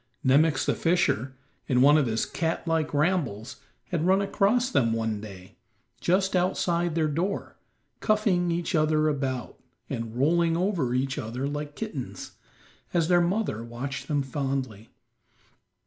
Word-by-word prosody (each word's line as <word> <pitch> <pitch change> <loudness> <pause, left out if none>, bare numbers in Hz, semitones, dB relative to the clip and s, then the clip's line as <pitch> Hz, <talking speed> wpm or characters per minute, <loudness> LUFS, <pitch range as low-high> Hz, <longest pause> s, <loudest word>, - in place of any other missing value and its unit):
Nemox, 140 +2 +4
the - - +2
fisher, 140 -7 +1 0.3
in 125 -1 +3
one 145 +2 +7
of 150 -4 +3
his 110 0 0
cat 165 +1 -2
like 160 -2 0
rambles, 145 - -1 0.3
had 170 -3 -1
run 190 +1 +4
across 215 +6 +1
them 115 - +2
one 110 -2 -2
day, 95 -3 -11 0.4
just 190 +2 +1
outside 175 -2 +1
their 160 -2 +2
door, 170 +7 -2 0.4
cuffing 205 -5 +2
each 170 0 -2
other 155 -1 +2
about, 135 -5 -2 0.3
and 115 0 -4
rolling 165 +5 +2
over 170 -10 0
each 130 +1 -1
other 120 +5 -4
like 145 0 -5
kittens, 185 - -6 0.6
as 165 -1 +2
their 175 -1 +5
mother 175 - -1
watched 130 +4 -6
them 145 -3 0
fondly. 135 -5 -3
150 Hz, 140 wpm, -27 LUFS, 130-175 Hz, 0.6 s, one